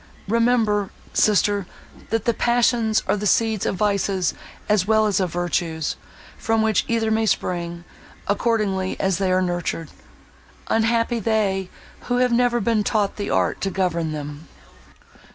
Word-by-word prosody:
Remember, 225 Hz, -2 st, +2 dB, 0.2 s
sister, 205 Hz, -2 st, +2 dB, 0.4 s
that 225 Hz, -2 st, -1 dB
the 235 Hz, -, +2 dB
passions 235 Hz, -2 st, +2 dB
are -, -, +2 dB
the 210 Hz, 0 st, -2 dB
seeds 220 Hz, -1 st, +1 dB
of -, -, -1 dB
vices 200 Hz, -2 st, 0 dB, 0.3 s
as 210 Hz, -3 st, +2 dB
well 220 Hz, 0 st, +4 dB
as 205 Hz, -3 st, +1 dB
of 185 Hz, -3 st, -1 dB
virtues, 170 Hz, -2 st, -2 dB, 0.4 s
from 225 Hz, -1 st, +1 dB
which 220 Hz, -1 st, +2 dB
either 225 Hz, -1 st, 0 dB
may 220 Hz, 0 st, +1 dB
spring, 170 Hz, -3 st, -2 dB, 0.4 s
accordingly 205 Hz, -3 st, 0 dB
as 190 Hz, -1 st, 0 dB
they 190 Hz, -2 st, +1 dB
are 185 Hz, 0 st, +2 dB
nurtured. 175 Hz, -2 st, -3 dB, 0.8 s
Unhappy 230 Hz, +1 st, +1 dB
they 195 Hz, -4 st, 0 dB, 0.4 s
who 245 Hz, -, 0 dB
have 250 Hz, 0 st, +2 dB
never 240 Hz, 0 st, +2 dB
been 220 Hz, 0 st, +1 dB
taught 205 Hz, -1 st, 0 dB
the 205 Hz, -1 st, -3 dB
art -, -, 0 dB
to 195 Hz, -, 0 dB
govern 175 Hz, -4 st, -1 dB
them!" 150 Hz, 0 st, -7 dB
205 Hz, 145 wpm, -22 LUFS, 185-225 Hz, 0.8 s, well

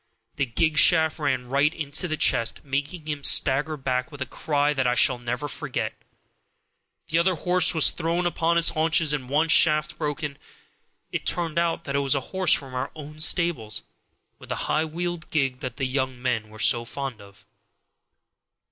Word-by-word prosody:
The 140 Hz, -2 st, 0 dB
gig 155 Hz, +7 st, +1 dB
shaft 160 Hz, -2 st, +4 dB
ran 130 Hz, -4 st, -1 dB
right 140 Hz, +4 st, +2 dB
into 155 Hz, +1 st, -2 dB
the 155 Hz, -2 st, -2 dB
chest, 115 Hz, -1 st, +2 dB
making 145 Hz, +4 st, -3 dB
him 145 Hz, -2 st, -4 dB
stagger 145 Hz, +4 st, +3 dB
back 130 Hz, +1 st, -2 dB
with 145 Hz, -, -11 dB
a 130 Hz, -, -2 dB
cry 145 Hz, +3 st, 0 dB
that 135 Hz, -3 st, 0 dB
I 125 Hz, -, +1 dB
shall 125 Hz, 0 st, +3 dB
never 120 Hz, +4 st, -4 dB
forget. 135 Hz, -, -4 dB, 1.2 s
The 165 Hz, -, +2 dB
other 180 Hz, +2 st, +2 dB
horse 180 Hz, +2 st, +3 dB
was 160 Hz, -, +4 dB
thrown 170 Hz, +1 st, -2 dB
upon 170 Hz, -1 st, 0 dB
his 170 Hz, 0 st, +5 dB
haunches 160 Hz, -1 st, +2 dB
and 130 Hz, -4 st, -4 dB
one 155 Hz, +4 st, +2 dB
shaft 155 Hz, -2 st, +3 dB
broken. 150 Hz, -1 st, -4 dB, 0.7 s
It -, -, -4 dB
turned 170 Hz, -2 st, 0 dB
out 170 Hz, -1 st, -1 dB
that 140 Hz, -, -4 dB
it -, -, +2 dB
was 140 Hz, 0 st, +1 dB
a -, -, +1 dB
horse 185 Hz, -1 st, +1 dB
from 135 Hz, -2 st, -3 dB
our 125 Hz, -, -3 dB
own 150 Hz, 0 st, -10 dB
stables, 155 Hz, -9 st, 0 dB, 0.6 s
with -, -, -14 dB
the -, -, -2 dB
high 155 Hz, +1 st, +1 dB
wheeled 175 Hz, +1 st, -5 dB
gig 135 Hz, -4 st, 0 dB
that 130 Hz, -3 st, -6 dB
the 135 Hz, -, -1 dB
young 130 Hz, -1 st, -2 dB
men 120 Hz, -4 st, -2 dB
were 110 Hz, -, -13 dB
so 120 Hz, +2 st, +3 dB
fond 130 Hz, -1 st, -6 dB
of. 100 Hz, -1 st, -17 dB
145 Hz, 185 wpm, -24 LUFS, 130-160 Hz, 1.2 s, his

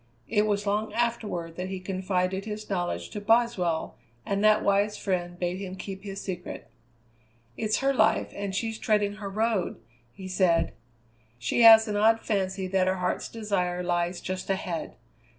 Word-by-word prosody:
It 210 Hz, -1 st, +2 dB
was 205 Hz, 0 st, 0 dB
long 210 Hz, +2 st, 0 dB
afterward 215 Hz, -8 st, -2 dB
that 180 Hz, +1 st, -4 dB
he 190 Hz, -1 st, -4 dB
confided 185 Hz, 0 st, -1 dB
his 215 Hz, -1 st, -6 dB
knowledge 175 Hz, -, -2 dB
to 205 Hz, -, -5 dB
Boswell, 205 Hz, -7 st, +1 dB, 0.3 s
and 200 Hz, +1 st, -1 dB
that 215 Hz, 0 st, +5 dB
wise 200 Hz, +1 st, +2 dB
friend 175 Hz, -2 st, -2 dB
bade 180 Hz, +1 st, -2 dB
him 190 Hz, -2 st, -6 dB
keep 190 Hz, 0 st, -7 dB
his 195 Hz, -1 st, -6 dB
secret. 180 Hz, -, -6 dB, 0.8 s
"It's 215 Hz, +2 st, 0 dB
her 275 Hz, 0 st, +2 dB
life, 220 Hz, -3 st, +2 dB
and 200 Hz, -1 st, -4 dB
she's 225 Hz, +1 st, -2 dB
treading 210 Hz, -1 st, +1 dB
her 205 Hz, -2 st, -5 dB
Road," 215 Hz, -2 st, -1 dB, 0.3 s
he 190 Hz, +8 st, -9 dB
said; 175 Hz, -3 st, +2 dB, 0.6 s
"she 120 Hz, -, 0 dB
has 225 Hz, -1 st, +9 dB
an 205 Hz, -1 st, -1 dB
odd 225 Hz, +2 st, +4 dB
fancy 190 Hz, -3 st, -1 dB
that 185 Hz, 0 st, +1 dB
her 185 Hz, -, +2 dB
Heart's 180 Hz, -1 st, -2 dB
Desire 185 Hz, -5 st, -1 dB
lies 175 Hz, 0 st, -1 dB
just 185 Hz, +1 st, -5 dB
ahead. 180 Hz, -4 st, -3 dB
195 Hz, 165 wpm, -27 LUFS, 180-215 Hz, 0.8 s, has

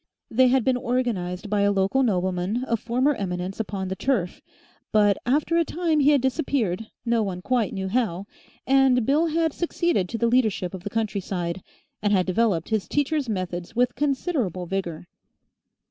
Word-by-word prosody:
They 255 Hz, +3 st, +5 dB
had 255 Hz, -1 st, +3 dB
been 255 Hz, +1 st, +2 dB
organised 235 Hz, -8 st, -2 dB
by 205 Hz, 0 st, +1 dB
a 200 Hz, 0 st, +3 dB
local 195 Hz, +7 st, +2 dB
nobleman 190 Hz, 0 st, 0 dB
of 230 Hz, -4 st, -1 dB
former 250 Hz, +6 st, +1 dB
eminence 185 Hz, -3 st, -4 dB
upon 195 Hz, -3 st, -3 dB
the 190 Hz, -, -3 dB
turf, 200 Hz, -6 st, -1 dB, 0.5 s
but 205 Hz, -2 st, +4 dB
after 300 Hz, +6 st, +2 dB
a 335 Hz, -, +4 dB
time 325 Hz, -1 st, 0 dB
he 285 Hz, 0 st, +5 dB
had 285 Hz, -3 st, +4 dB
disappeared, 250 Hz, -, -1 dB, 0.2 s
no 235 Hz, -1 st, +2 dB
one 185 Hz, -3 st, -3 dB
quite 245 Hz, -4 st, +1 dB
knew 190 Hz, 0 st, -3 dB
how 200 Hz, -4 st, -1 dB, 0.4 s
and 265 Hz, -3 st, +4 dB
Bill 300 Hz, +6 st, +3 dB
had 325 Hz, -1 st, 0 dB
succeeded 340 Hz, -, 0 dB
to 230 Hz, -, -3 dB
the 235 Hz, -, +1 dB
leadership 220 Hz, -7 st, +1 dB
of 190 Hz, -, -6 dB
the 205 Hz, -, -4 dB
countryside, 195 Hz, -5 st, -2 dB, 0.4 s
and 205 Hz, -, +1 dB
had 185 Hz, -2 st, +3 dB
developed 190 Hz, -2 st, +1 dB
his 220 Hz, -3 st, -1 dB
teacher's 290 Hz, -2 st, 0 dB
methods 180 Hz, -2 st, -4 dB
with 245 Hz, +1 st, +2 dB
considerable 270 Hz, -, -1 dB
vigour. 175 Hz, -3 st, -4 dB
225 Hz, 170 wpm, -24 LUFS, 190-265 Hz, 0.5 s, They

